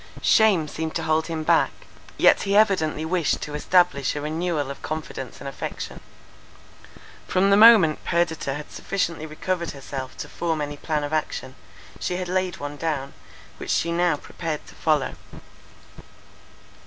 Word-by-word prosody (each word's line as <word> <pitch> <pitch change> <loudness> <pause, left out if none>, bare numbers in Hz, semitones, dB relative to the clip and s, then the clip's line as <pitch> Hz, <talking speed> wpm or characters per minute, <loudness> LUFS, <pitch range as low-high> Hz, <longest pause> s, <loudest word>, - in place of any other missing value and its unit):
Shame 200 -8 +4
seemed 160 +1 -4
to 165 - -1
hold 160 0 +1
him 160 -2 -3
back; - - +4 0.5
yet - - +5
he 200 0 0
evidently 160 -8 +2
wished 170 -1 +1
to 150 - -6
establish 150 -3 +2
a 145 - -3
renewal 155 -2 -2
of 140 - -9
confidence 155 -5 -6
and 140 - -7
affection. 135 - -6 1.3
From 195 +2 +2
the - - +7
moment 210 -8 +7
Perdita 160 -5 0
had 150 0 -8
sufficiently 170 -5 -2
recovered 170 +2 -3
herself 135 -1 -7
to - - -6
form 165 -2 -2
any 145 0 -4
plan 150 0 -2
of 145 +1 -4
action, 140 -4 -2 0.5
she 180 - -2
had 180 0 -3
laid 185 -1 -1
one 145 0 -6
down, 145 -4 -2 0.4
which - - 0
now 170 0 +2
she - - -13
prepared 160 -3 -5
to - - -14
follow. 150 -4 +1
160 Hz, 155 wpm, -24 LUFS, 150-180 Hz, 1.3 s, the